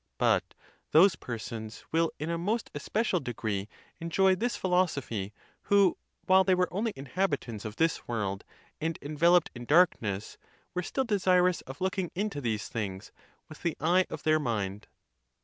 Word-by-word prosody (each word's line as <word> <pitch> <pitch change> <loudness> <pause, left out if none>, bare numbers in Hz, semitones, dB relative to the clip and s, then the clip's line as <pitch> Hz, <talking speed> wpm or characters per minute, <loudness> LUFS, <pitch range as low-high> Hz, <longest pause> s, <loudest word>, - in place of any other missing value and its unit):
But - - +1 0.4
those 175 +3 +7
persons 115 -3 -7
will 165 0 +2
in 155 +3 -3
a 170 - -1
most 210 +6 -1
especial 185 +6 0
degree 110 -6 -3 0.3
enjoy 190 +3 +3
this 235 +6 -1
philosophy, 145 - 0 0.3
who, 200 -3 +4 0.3
while 190 0 +6
they 185 0 +3
were 180 0 +2
only 220 +4 0
inhabitants 135 - -2
of 110 -1 -5
this 165 +3 0
world 100 -4 -2 0.4
and 160 +1 -2
enveloped 165 +4 +3
in 120 -1 -8
darkness, 115 - +2 0.3
were 180 - -1
still 265 +9 -2
desirous 180 -5 +3
of 135 +4 -9
looking 190 -1 -1
into 200 -6 -2
these 110 -4 -2
things 100 -3 -5 0.4
with 155 - -12
the 170 -3 -1
eye 180 +4 +3
of - - -7
their 155 0 +3
mind. 105 -6 -2
160 Hz, 150 wpm, -29 LUFS, 115-185 Hz, 0.4 s, those